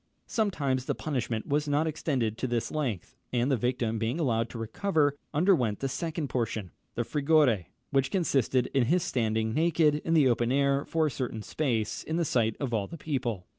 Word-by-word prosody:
Sometimes 145 Hz, -, 0 dB
the -, -, -1 dB
punishment 125 Hz, -7 st, -2 dB
was 145 Hz, +1 st, 0 dB
not 145 Hz, +2 st, +2 dB
extended 135 Hz, -8 st, -1 dB
to 130 Hz, -, -1 dB
this 120 Hz, -1 st, -1 dB
length, 130 Hz, -, -3 dB, 0.2 s
and 125 Hz, +2 st, +1 dB
the -, -, +4 dB
victim 120 Hz, -1 st, -1 dB
being 115 Hz, +8 st, -1 dB
allowed 115 Hz, -6 st, +1 dB
to -, -, -8 dB
recover, 145 Hz, -, +1 dB, 0.2 s
underwent 150 Hz, -, +2 dB
the 135 Hz, -, -1 dB
second 160 Hz, +2 st, -3 dB
portion, 110 Hz, -8 st, -2 dB, 0.2 s
the 120 Hz, -, 0 dB
frigore, 140 Hz, -, +3 dB, 0.3 s
which 135 Hz, -1 st, +2 dB
consisted 135 Hz, -, +1 dB
in 135 Hz, -3 st, +3 dB
his 170 Hz, +7 st, +2 dB
standing 110 Hz, -2 st, 0 dB
naked 155 Hz, -1 st, +3 dB
in 165 Hz, -, +1 dB
the 150 Hz, -4 st, +5 dB
open 120 Hz, 0 st, +1 dB
air, 140 Hz, +1 st, +2 dB
for 160 Hz, -1 st, +1 dB
a 150 Hz, -, 0 dB
certain 120 Hz, -4 st, -4 dB
space, 115 Hz, -8 st, -1 dB
in 160 Hz, -, -3 dB
the 170 Hz, -, +1 dB
sight 115 Hz, -5 st, +1 dB
of 135 Hz, -4 st, -2 dB
all 105 Hz, -3 st, 0 dB
the 165 Hz, -, -8 dB
people. 125 Hz, -, -3 dB
130 Hz, 190 wpm, -29 LUFS, 115-155 Hz, 0.3 s, the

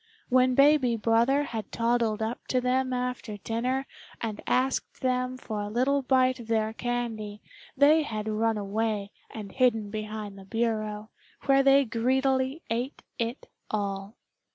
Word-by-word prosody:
When 255 Hz, 0 st, +4 dB
baby 275 Hz, -3 st, +5 dB
brother 235 Hz, +6 st, +3 dB
had 225 Hz, -6 st, -5 dB
toddled 230 Hz, -2 st, +1 dB
up 225 Hz, +2 st, -4 dB
to 255 Hz, -, +2 dB
them 255 Hz, +1 st, +1 dB
after 250 Hz, -4 st, -3 dB
dinner 250 Hz, +6 st, -1 dB, 0.3 s
and 220 Hz, -2 st, -4 dB
asked 260 Hz, +1 st, 0 dB
them 255 Hz, 0 st, 0 dB
for 215 Hz, -4 st, -4 dB
a 205 Hz, -, -4 dB
little 260 Hz, +5 st, +2 dB
bite 255 Hz, -1 st, +2 dB
of 235 Hz, -, -9 dB
their 220 Hz, -1 st, +1 dB
candy 225 Hz, -4 st, -3 dB, 0.4 s
they 295 Hz, +3 st, +6 dB
had 215 Hz, -7 st, -4 dB
run 220 Hz, +1 st, +1 dB
away 210 Hz, 0 st, -2 dB, 0.2 s
and 210 Hz, -3 st, -8 dB
hidden 225 Hz, -5 st, +2 dB
behind 215 Hz, -2 st, -5 dB
the 190 Hz, -, -12 dB
bureau, 215 Hz, -1 st, -2 dB, 0.3 s
where 275 Hz, 0 st, +5 dB
they 275 Hz, 0 st, +5 dB
greedily 260 Hz, +5 st, +1 dB
ate 245 Hz, +5 st, -2 dB, 0.2 s
it 235 Hz, +3 st, -3 dB, 0.2 s
all. 200 Hz, 0 st, -3 dB
235 Hz, 145 wpm, -28 LUFS, 215-255 Hz, 0.4 s, they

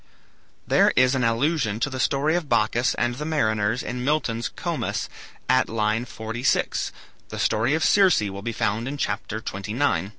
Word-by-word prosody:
There -, -, +4 dB
is 130 Hz, +1 st, +4 dB
an 130 Hz, -2 st, 0 dB
allusion 115 Hz, -1 st, +1 dB
to -, -, +2 dB
the 130 Hz, -2 st, -5 dB
story 140 Hz, +5 st, +1 dB
of 170 Hz, -5 st, -2 dB
Bacchus 120 Hz, +4 st, +2 dB
and 120 Hz, -, 0 dB
the 140 Hz, +5 st, -6 dB
mariners 110 Hz, -7 st, 0 dB
in 125 Hz, 0 st, -4 dB
Milton's 125 Hz, -5 st, 0 dB
"Comus," -, -, -3 dB, 0.4 s
at 130 Hz, 0 st, +3 dB
line 110 Hz, +1 st, 0 dB
46, 110 Hz, +2 st, -1 dB, 0.4 s
The -, -, -7 dB
story 115 Hz, +6 st, +1 dB
of 160 Hz, -, 0 dB
Circe 190 Hz, -, +5 dB
will 100 Hz, -1 st, -4 dB
be 115 Hz, +3 st, -3 dB
found 110 Hz, +1 st, -1 dB
in 145 Hz, +2 st, -4 dB
CHAPTER 110 Hz, -5 st, -3 dB
XXIX. 100 Hz, -, -1 dB
120 Hz, 165 wpm, -24 LUFS, 110-140 Hz, 0.4 s, Circe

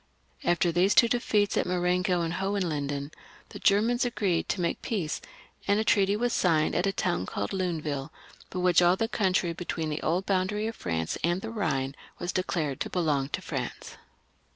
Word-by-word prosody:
After 175 Hz, 0 st, +2 dB
these 180 Hz, +4 st, +3 dB
two 235 Hz, -, +7 dB
defeats 215 Hz, -4 st, +1 dB
of -, -, +1 dB
Marengo 180 Hz, 0 st, +1 dB
and 165 Hz, 0 st, -1 dB
Hohenlinden, 155 Hz, -7 st, -2 dB, 0.4 s
the -, -, -9 dB
Germans 225 Hz, +5 st, +3 dB
agreed 200 Hz, -8 st, 0 dB
to -, -, -1 dB
make 170 Hz, -1 st, -1 dB
peace, 185 Hz, -9 st, -2 dB, 0.5 s
and 200 Hz, +1 st, +3 dB
a -, -, +2 dB
treaty 200 Hz, -2 st, +3 dB
was 240 Hz, +2 st, 0 dB
signed 160 Hz, -7 st, +2 dB
at 190 Hz, -, +1 dB
a -, -, +2 dB
town 180 Hz, -, -1 dB
called 100 Hz, -, -3 dB
Luneville, 155 Hz, -7 st, -2 dB, 0.4 s
by -, -, -6 dB
which 180 Hz, 0 st, +4 dB
all 175 Hz, +1 st, +5 dB
the 225 Hz, +4 st, 0 dB
country 185 Hz, -6 st, +1 dB
between 165 Hz, -2 st, -3 dB
the 150 Hz, -, -3 dB
old 175 Hz, +4 st, 0 dB
boundary 200 Hz, +2 st, 0 dB
of 225 Hz, 0 st, -3 dB
France 80 Hz, -2 st, -2 dB
and 175 Hz, +3 st, +1 dB
the 225 Hz, -, -5 dB
Ehine 135 Hz, -11 st, -1 dB, 0.2 s
was 175 Hz, -, -3 dB
declared 160 Hz, -7 st, -1 dB
to -, -, -2 dB
belong 150 Hz, -6 st, 0 dB
to -, -, -4 dB
France. -, -, -5 dB
180 Hz, 180 wpm, -28 LUFS, 160-200 Hz, 0.5 s, two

